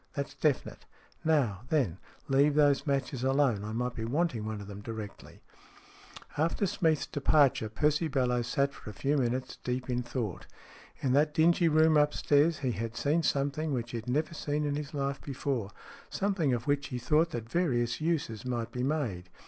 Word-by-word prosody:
That's 140 0 -3
definite. 150 -4 -1 0.4
Now, 135 -12 +2
then, 120 - +1 0.3
leave 140 +2 +3
those 145 0 +3
matches 135 -2 -1
alone. 135 -6 +2
I 105 - -5
might 125 +2 -2
be 115 - -5
wanting 125 -2 0
one 110 -1 -4
of 100 - -8
them 100 0 -8
directly." 110 -2 -8 1.0
After 165 +6 +1
Smeath's 160 -4 +1
departure, 140 -5 +2
Percy 150 +8 +1
Bellowes 125 -4 0
sat 140 +2 +1
for - - -10
a - - -8
few 140 +8 0
minutes 130 -1 -1
deep 125 +1 -2
in 125 0 0
thought. 120 -6 -4 0.5
In 130 -2 +1
that 150 +2 +3
dingy 170 +2 +4
room 155 0 +5
upstairs 150 +1 +3
he 125 - +2
had 115 0 -4
seen 150 +7 +1
something 145 +1 0
which 120 -2 -3
he 120 - -3
had 115 +1 -6
never 155 +6 0
seen 150 -1 -2
in 145 -1 -1
his 150 +1 -5
life 140 -1 -2
before, 135 -6 -3 0.4
something 190 -8 0
of 120 -1 -1
which 145 -1 0
he 125 - -4
thought 150 +7 +2
that 120 -8 -5
various 120 -6 0
uses 155 -10 -1
might 120 -3 -3
be 125 - -4
made. 125 - -2
135 Hz, 180 wpm, -30 LUFS, 120-150 Hz, 1.0 s, room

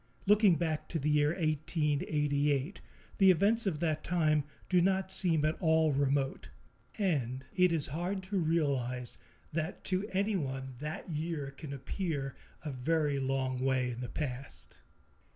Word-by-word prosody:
Looking 205 -2 +6
back 155 -1 -2
to 170 - -1
the 150 0 0
year 150 0 +4
1888, 150 -1 0 0.4
the 195 -1 +7
events 205 +5 +4
of 160 -6 -1
that 155 -2 0
time 155 -4 +2 0.2
do 180 -1 +4
not 190 +1 +1
seem 165 -5 +2
at 155 - +2
all 160 -2 +4
remote, 140 0 0 0.5
and 135 - 0
it 180 -1 +4
is 160 -4 +1
hard 175 +6 -3
to 190 +1 -1
realize 140 -7 0 0.3
that 160 +2 -3
to 190 +3 -1
anyone 145 -10 -1
that 150 +2 -5
year 155 -2 -3
can 140 +1 -9
appear 140 0 -3 0.3
a 150 - -2
very 145 +2 0
long 130 -1 -1
way 130 -1 +1
in 120 +1 -6
the 125 - -4
past. 135 -3 -5
155 Hz, 145 wpm, -32 LUFS, 140-175 Hz, 0.5 s, the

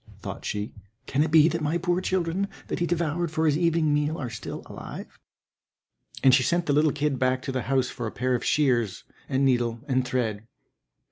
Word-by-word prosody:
thought - - -7
she, 105 +1 -3 0.3
"can 140 - 0
it 155 - +2
be 160 0 +6
that 165 -1 -1
my 155 +3 +1
poor 175 +1 0
children 185 +1 0 0.2
that - - -2
he 175 - +1
devoured 170 0 0
for 160 +1 0
his 150 -2 +3
evening 165 -2 +2
meal 150 +2 0
are 125 -7 -4
still 110 - -6
alive?" - - -9 1.0
And 130 - +7
she 130 - +6
sent 170 +5 +1
the 145 - +1
little 150 +1 +4
kid 145 -2 -1
back 130 0 +1
to 135 - -3
the 130 -1 -1
house 130 -2 +2
for 120 -3 -5
a - - -5
pair 125 +1 -1
of 125 - 0
shears, 120 -10 +1 0.3
and 135 0 +2
needle, 120 -3 +1
and 130 -2 +2
thread. 115 -4 -2
145 Hz, 205 wpm, -26 LUFS, 125-165 Hz, 1.0 s, And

